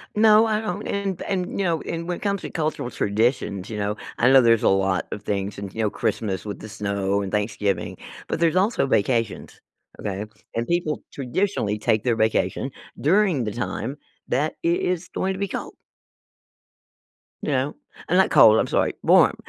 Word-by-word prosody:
No, 215 +1 +6
I 215 0 0
don't, 210 -1 -4
and 200 -3 -2
and, 185 -2 -2
you - - +1
know, 165 -3 0
and 170 0 -4
when 175 - -2
it - - -14
comes 200 -2 -1
to - - -6
cultural 155 -6 -2
traditions, 105 -3 0
you 110 - -5
know, 105 0 -1 0.2
I 125 - +4
know 135 0 +8
there's 115 -2 +4
a - - +5
lot 95 -1 +1
of 105 - -5
things 100 0 -2
and, 100 -2 -7
you 115 - -3
know, 105 - +2
Christmas 100 -1 -2
with 105 - -5
the 110 - -9
snow 100 -1 -1
and 95 - -4
Thanksgiving, 105 -1 -1 0.3
but - - -2
there's 165 0 +2
also 195 - +2
vacations, 115 -1 0 0.4
okay? 100 0 -3 0.3
And 115 +1 -1
people 170 -3 0
traditionally 135 - -1
take 110 0 +1
their 120 -2 +2
vacation 110 +4 0 0.3
during 175 - +3
the 105 - -2
time 120 +4 -4 0.3
that 145 +5 0
it 170 +1 +2
is 180 -1 -1
going 190 0 -1
to 190 - -7
be 200 - 0
cold. - - -5 1.7
You - - -2
know? 135 +1 0 0.3
And 180 - +2
not 190 - +5
cold, 110 +1 +7
I'm - - +1
sorry, - - +1
warm. - - +5
125 Hz, 190 wpm, -23 LUFS, -, 1.7 s, know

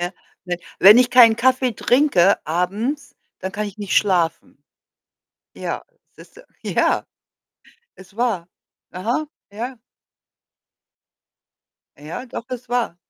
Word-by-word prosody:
Ja, 175 +1 -3 0.3
ne. 180 -1 -2 0.2
Wenn 205 +5 +9
ich 250 -1 +3
keinen 240 -3 +7
Kaffee 255 +1 +2
trinke 220 -7 +3
abends, 200 - -2 0.2
dann 190 - -4
kann 210 +2 -3
ich 205 0 -10
nicht 205 -3 -2
schlafen. 180 -5 0 0.9
Ja, - - -5 0.3
siehst - - -17
du? - - -12 0.2
Ja, - - +1 0.9
ist 190 +1 -17
wahr. 220 -8 -1 0.4
Aha, 235 +11 -2 0.2
ja. 240 +6 -6 2.2
Ja, 155 - -7
doch, 245 0 -8
ist 250 -1 -7
wahr. 240 -7 -1
220 Hz, 115 wpm, -21 LUFS, 185-250 Hz, 2.2 s, Wenn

